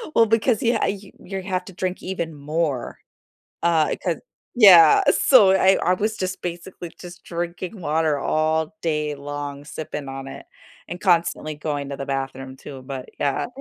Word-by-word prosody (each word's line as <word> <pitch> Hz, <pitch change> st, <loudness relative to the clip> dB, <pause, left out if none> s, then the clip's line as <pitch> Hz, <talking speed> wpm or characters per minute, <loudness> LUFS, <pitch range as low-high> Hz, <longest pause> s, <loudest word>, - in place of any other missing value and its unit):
Well, 230 Hz, -, +6 dB
because 225 Hz, +1 st, +2 dB
yeah, 235 Hz, 0 st, +1 dB
you 200 Hz, 0 st, -4 dB
your 195 Hz, 0 st, -6 dB
have 185 Hz, -1 st, -2 dB
to 195 Hz, -, -11 dB
drink 185 Hz, 0 st, -4 dB
even 170 Hz, -4 st, -4 dB
more, 145 Hz, -3 st, -2 dB, 0.7 s
uh, 165 Hz, -3 st, +2 dB
'cause -, -, 0 dB, 0.4 s
Yeah, 180 Hz, -8 st, +8 dB
so 230 Hz, -8 st, +6 dB
I 190 Hz, 0 st, +4 dB
I 180 Hz, -, +3 dB
was 215 Hz, +3 st, -2 dB
just, 185 Hz, 0 st, -4 dB
basically, 175 Hz, 0 st, -6 dB
just 175 Hz, -1 st, -11 dB
drinking 175 Hz, +3 st, -5 dB
water 155 Hz, -2 st, 0 dB
all 155 Hz, +4 st, 0 dB
day 150 Hz, -2 st, -1 dB
long, 145 Hz, 0 st, -6 dB
sipping 150 Hz, -1 st, -6 dB
on 135 Hz, 0 st, -7 dB
it, -, -, -10 dB, 0.4 s
and 175 Hz, -, -6 dB
constantly 170 Hz, -4 st, +1 dB
going 145 Hz, -2 st, -4 dB
to 140 Hz, -, -4 dB
the 135 Hz, -, -6 dB
bathroom 135 Hz, -1 st, -4 dB
too, 135 Hz, -1 st, -10 dB
but 130 Hz, -1 st, -7 dB
yeah. 140 Hz, -, 0 dB
165 Hz, 165 wpm, -22 LUFS, 145-185 Hz, 0.7 s, Yeah